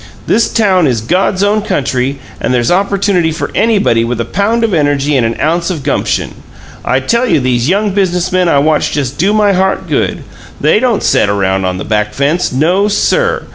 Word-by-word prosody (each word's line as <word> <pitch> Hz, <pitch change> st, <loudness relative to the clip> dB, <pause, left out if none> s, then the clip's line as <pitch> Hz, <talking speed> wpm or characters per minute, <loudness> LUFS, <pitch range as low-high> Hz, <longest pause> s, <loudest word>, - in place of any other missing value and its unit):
This 230 Hz, -, +1 dB
town 190 Hz, -7 st, +2 dB
is 120 Hz, -4 st, 0 dB
God's 185 Hz, -, 0 dB
own 210 Hz, +1 st, +1 dB
country, 135 Hz, -8 st, -2 dB, 0.2 s
and -, -, -2 dB
there's 120 Hz, +1 st, +1 dB
opportunity 195 Hz, -2 st, +1 dB
for 160 Hz, -, -4 dB
anybody 205 Hz, -, +2 dB
with 120 Hz, 0 st, -3 dB
a 115 Hz, -, -1 dB
pound 210 Hz, -, -1 dB
of 225 Hz, -3 st, 0 dB
energy 145 Hz, -2 st, +1 dB
and 130 Hz, -, +2 dB
an 115 Hz, 0 st, -2 dB
ounce 170 Hz, +3 st, 0 dB
o' 180 Hz, -, -2 dB
gumption. 140 Hz, -, -2 dB, 0.5 s
I 130 Hz, +1 st, +1 dB
tell 235 Hz, -, 0 dB
you -, -, +2 dB
these 125 Hz, 0 st, 0 dB
young 200 Hz, +1 st, 0 dB
business 185 Hz, -2 st, 0 dB
men 185 Hz, -1 st, +1 dB
I 145 Hz, -, +3 dB
watch 150 Hz, +2 st, +1 dB
just 140 Hz, -2 st, -3 dB
do 190 Hz, +5 st, +2 dB
my 210 Hz, -1 st, +2 dB
heart 190 Hz, +1 st, 0 dB
good! -, -, -1 dB, 0.4 s
THEY -, -, +2 dB
don't 245 Hz, -5 st, 0 dB
set -, -, +2 dB
around 95 Hz, -1 st, 0 dB
on 90 Hz, 0 st, -2 dB
the 95 Hz, -, -6 dB
back 105 Hz, -1 st, -1 dB
fence 150 Hz, +6 st, 0 dB
no, 175 Hz, +10 st, +1 dB
sir! 470 Hz, -, 0 dB
170 Hz, 200 wpm, -12 LUFS, 130-200 Hz, 0.5 s, I